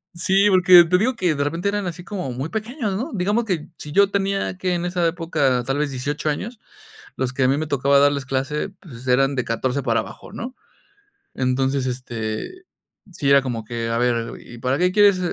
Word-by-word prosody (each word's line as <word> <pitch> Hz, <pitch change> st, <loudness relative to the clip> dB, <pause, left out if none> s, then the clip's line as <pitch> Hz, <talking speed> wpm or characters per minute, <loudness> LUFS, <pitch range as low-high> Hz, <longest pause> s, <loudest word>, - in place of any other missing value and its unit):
Sí, 190 Hz, +4 st, +3 dB
porque 180 Hz, -1 st, +8 dB
te 180 Hz, +2 st, +2 dB
digo 255 Hz, +4 st, +1 dB
que 180 Hz, -8 st, +1 dB
de 140 Hz, -, -1 dB
repente 165 Hz, +7 st, -1 dB
eran 205 Hz, -2 st, -2 dB
así 175 Hz, +1 st, -6 dB
como 180 Hz, -9 st, -5 dB
muy 135 Hz, +6 st, -4 dB
pequeños, 220 Hz, -1 st, -3 dB
¿no?, 260 Hz, +9 st, -3 dB
digamos 205 Hz, +5 st, 0 dB
que 175 Hz, -7 st, -3 dB
si 150 Hz, -, -9 dB
yo 200 Hz, +4 st, +4 dB
tenía, 195 Hz, -1 st, -1 dB
¿qué?, 180 Hz, -1 st, 0 dB
en 175 Hz, 0 st, -2 dB
esa 175 Hz, -1 st, 0 dB
época, 155 Hz, -7 st, 0 dB
tal 135 Hz, +2 st, -1 dB
vez 150 Hz, -1 st, 0 dB
18 145 Hz, +3 st, -3 dB
años, 220 Hz, +10 st, -4 dB, 0.6 s
los 130 Hz, 0 st, -2 dB
que 135 Hz, -, 0 dB
a 130 Hz, -, +4 dB
mí 135 Hz, +2 st, +2 dB
me 155 Hz, -, -2 dB
tocaba 140 Hz, -1 st, +2 dB
darles 140 Hz, -1 st, +3 dB
clase, 135 Hz, +7 st, -2 dB
pues, 130 Hz, -7 st, -12 dB
eran 135 Hz, +2 st, +3 dB
de 125 Hz, -, -1 dB
14 125 Hz, +4 st, -1 dB
para 115 Hz, -2 st, +1 dB
abajo, -, -, -11 dB
¿no?, 250 Hz, +4 st, -7 dB, 0.8 s
entonces, 130 Hz, +1 st, 0 dB
este, 120 Hz, -, -5 dB, 0.5 s
sí 140 Hz, -5 st, -1 dB
era 140 Hz, 0 st, +7 dB
como 120 Hz, -4 st, -4 dB
que: 115 Hz, 0 st, -4 dB
"A 115 Hz, -, -1 dB
ver, 120 Hz, -1 st, 0 dB
'¿y 120 Hz, -, -12 dB
para 130 Hz, +2 st, 0 dB
qué 180 Hz, +3 st, +2 dB
quieres 205 Hz, -1 st, +5 dB
150 Hz, 210 wpm, -22 LUFS, 130-185 Hz, 0.8 s, porque